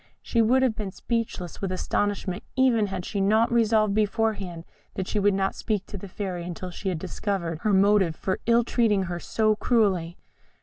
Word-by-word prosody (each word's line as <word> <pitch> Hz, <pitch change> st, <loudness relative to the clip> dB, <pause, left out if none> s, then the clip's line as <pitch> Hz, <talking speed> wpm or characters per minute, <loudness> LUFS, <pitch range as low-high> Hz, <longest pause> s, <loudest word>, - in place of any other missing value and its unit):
She 230 Hz, -, +1 dB
would 255 Hz, +4 st, +4 dB
have 245 Hz, -4 st, +2 dB
been 210 Hz, -3 st, -4 dB
speechless 220 Hz, -3 st, -4 dB
with 195 Hz, -2 st, -2 dB
astonishment 190 Hz, 0 st, -1 dB
even 245 Hz, -5 st, +3 dB
had 190 Hz, -2 st, -5 dB
she 200 Hz, -, -2 dB
not 220 Hz, +4 st, +3 dB
resolved 220 Hz, -3 st, +3 dB
beforehand 205 Hz, -5 st, -1 dB, 0.3 s
that 190 Hz, -, -3 dB
she 210 Hz, -, -1 dB
would 200 Hz, -1 st, +3 dB
not 195 Hz, 0 st, 0 dB
speak 210 Hz, -3 st, -2 dB
to -, -, -10 dB
the 200 Hz, -, -8 dB
Fairy 185 Hz, -2 st, -4 dB
until 180 Hz, +1 st, -6 dB
she 190 Hz, +2 st, -4 dB
had 180 Hz, -, -2 dB
discovered 175 Hz, -2 st, -3 dB
her 215 Hz, -, 0 dB
motive 195 Hz, -3 st, +4 dB
for 185 Hz, +3 st, -2 dB
ill 235 Hz, 0 st, +5 dB
treating 225 Hz, -4 st, +2 dB
her 175 Hz, -1 st, -4 dB
so 215 Hz, +3 st, +1 dB
cruelly. 195 Hz, -7 st, +1 dB
200 Hz, 185 wpm, -26 LUFS, 185-220 Hz, 0.3 s, ill